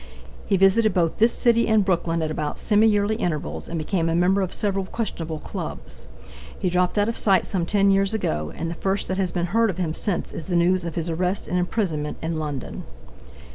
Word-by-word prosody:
He 195 - +2
visited 195 +3 +4
both 170 -3 +1
this 230 +2 +5
city 235 -1 +2
and 220 -3 +3
Brooklyn 170 -3 0
at 155 - -2
about 150 -1 -3
semi 215 +1 +3
yearly 210 0 +2
intervals 165 -8 -3
and 170 - -3
became 165 +1 0
a 165 - +1
member 185 +3 +3
of 185 - -2
several 195 -2 -1
questionable 170 -7 -4
clubs. 65 - -6 0.5
He 180 - -1
dropped 180 +2 +1
out 205 0 +3
of 230 - -2
sight 195 -3 +3
some 175 -4 -2
10 200 -1 +3
years 195 0 +3
ago, 75 - -2
and 165 - -3
the 165 - -3
first 190 +3 -1
that 185 - -1
has 190 -2 +1
been 175 -1 -1
heard 230 0 +4
of 185 - -3
him 170 -4 -1
since 190 +1 -2
is 165 - -6
the 180 - -1
news 175 +1 +3
of 170 - -5
his 170 0 -2
arrest 180 +4 -1
and 180 - 0
imprisonment 175 -6 -1
in 160 0 -2
London. 150 -3 -5
180 Hz, 215 wpm, -23 LUFS, 165-200 Hz, 0.5 s, this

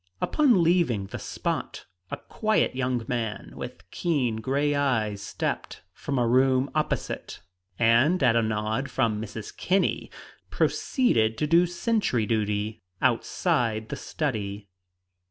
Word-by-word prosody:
Upon 250 - +3
leaving 165 - +2
the - - -7
spot, - - -4 0.2
a - - -4
quiet 215 - 0
young 125 -3 -1
man 115 -3 -3
with - - -8
keen 135 -10 0
gray 140 +5 0
eyes 115 -8 0
stepped 100 - -4
from 140 -2 -3
a 120 -1 +2
room 130 +2 +3
opposite, 155 0 -2 0.4
and 120 +9 +4
at 120 -3 +4
a 115 - +4
nod 110 +4 -1
from 110 -5 0
Mrs. 110 -1 -7
Kinney 190 +1 0 0.4
proceeded 115 - +1
to 150 - 0
do 170 +3 +4
sentry 175 - 0
duty 105 -1 -1 0.2
outside 110 -2 0
the - - -3
study. 105 -8 -3
125 Hz, 125 wpm, -26 LUFS, 110-150 Hz, 0.4 s, and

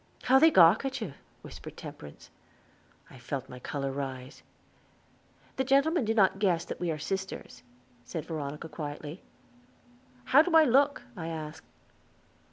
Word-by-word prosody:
"How 265 +1 +5
they 320 - +7
gawk 180 - +6
at 270 0 -3
you," 200 - -5 0.3
whispered - - -10
Temperance. 75 -1 -11 0.8
I 130 - -13
felt 135 +2 -5
my 125 - -10
color 135 +1 -3
rise. 135 -1 -6 1.2
"The 265 - +1
gentlemen 275 +2 +2
do 225 +1 0
not 195 -2 +3
guess 180 -5 +1
that - - -6
we 175 0 -2
are 155 - -1
sisters," 190 -6 -5 0.4
said 155 +6 -6
Veronica 150 -1 -5
quietly. 150 +1 -7 1.0
"How 280 - +6
do 330 +1 0
I 320 - +8
look?" 280 0 +3
I 165 -4 -6
asked. 155 -2 -7
165 Hz, 145 wpm, -29 LUFS, -, 1.2 s, I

